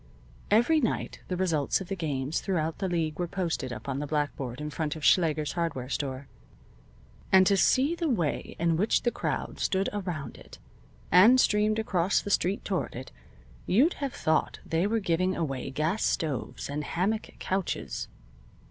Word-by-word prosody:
Every 240 +9 +4
night 235 -7 -2
the 180 - -2
results 165 -6 +1
of 190 - -7
the 195 - -3
games 145 -4 -2
throughout 165 -5 -1
the 190 - -1
league 160 -2 -1
were 175 - 0
posted 165 -8 -2
up 110 +1 -7
on 135 0 -2
the 145 - -3
blackboard 145 -4 -2
in 150 0 -4
front 150 0 -2
of 155 - -5
Schlager's 155 -4 +3
hardware 160 -8 -3
store, 140 -1 -3 1.0
and 190 0 +7
to 200 - +4
see 265 - +3
the 335 -2 -1
way 175 - -1
in 165 -1 +1
which 210 +6 +2
the 240 - +2
crowd - - -3
stood 190 0 +1
around 180 -8 -4
it, - - -13 0.5
and 215 +9 +7
streamed 215 -1 +3
across 190 -4 +1
the 205 - -5
street 190 +1 +1
toward 190 -3 -2
it, 130 +2 -7 0.6
you'd 265 - +4
have 275 -2 -2
thought 155 0 0
they 165 +4 +1
were 225 +2 +1
giving 185 -1 0
away 135 -6 -3
gas 155 +10 -1
stoves 145 -8 -2
and 145 +1 -3
hammock 195 +8 -1
couches. 190 -1 -3
170 Hz, 170 wpm, -28 LUFS, 150-200 Hz, 1.0 s, and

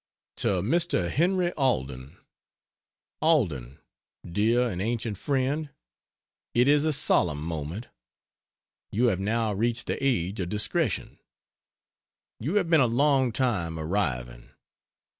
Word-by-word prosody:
To 90 -3 0
Mr. 130 - +1
Henry 175 +2 +2
Alden: 65 - -1 1.0
ALDEN, 85 - +1 0.5
dear 115 +7 +2
and 90 -5 -4
ancient 115 0 -2
friend 140 +2 -1 0.9
it 125 +2 +4
is 145 +1 +4
a 155 - +2
solemn 85 - +2
moment. 80 +6 -4 1.1
You 120 +4 +3
have 95 -4 -1
now 110 +2 0
reached 115 +4 -1
the - - -3
age 100 -8 0
of 90 -2 -2
discretion. 115 - -1 1.2
You 150 - -2
have 195 -4 +2
been 165 -3 +5
a 125 - +4
long 130 +1 +2
time 100 -10 -1
arriving. 65 -9 -2
115 Hz, 115 wpm, -27 LUFS, 85-140 Hz, 1.2 s, been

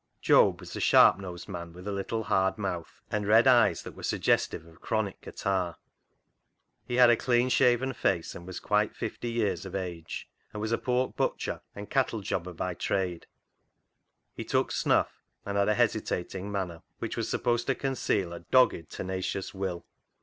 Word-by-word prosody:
Job - - +4
was - - -9
a - - -4
sharp - - +6
nosed 90 -3 -7
man 85 -4 -7
with 90 +2 -11
a - - -1
hard 100 - -2
little 110 +3 -2 0.4
mouth 90 -4 -5
and 105 -1 -1
red 110 +3 +6
eyes 120 -9 +5
that - - -9
were - - -11
suggestive 80 - 0
of 85 0 -18
chronic 110 -3 -2
catarrh. 95 -4 -2 1.1
He 120 - -2
had 125 -1 +7
a - - +5
clean 120 +1 +2
shaven 125 +1 +3
face, 95 -6 0
was 90 +1 -7
quite 105 0 +1
fifty 120 - -4
years 115 -3 0
of 95 -1 -7
age, 90 -4 -5 0.3
and 105 - -5
was 110 +1 -2
a 115 - +1
pork 125 0 0
butcher - - -2
and 100 0 -7
cattle 125 -5 0
jobber 90 -2 -3
by 90 +2 -3
trade. 90 -1 -2 1.1
He - - -6
took - - 0
snuff, - - +1 0.2
and 100 - -3
had 100 +1 +2
a 105 - +3
hesitating 105 -4 -1
manner, 90 -4 -3 0.2
which - - -4
was - - -2
supposed 120 -1 0
to 135 - +2
conceal 105 -9 -1
a 85 - -6
dogged, 85 -4 +3
tenacious 95 +1 -4
will. 95 -3 -4
100 Hz, 175 wpm, -29 LUFS, 90-115 Hz, 1.1 s, had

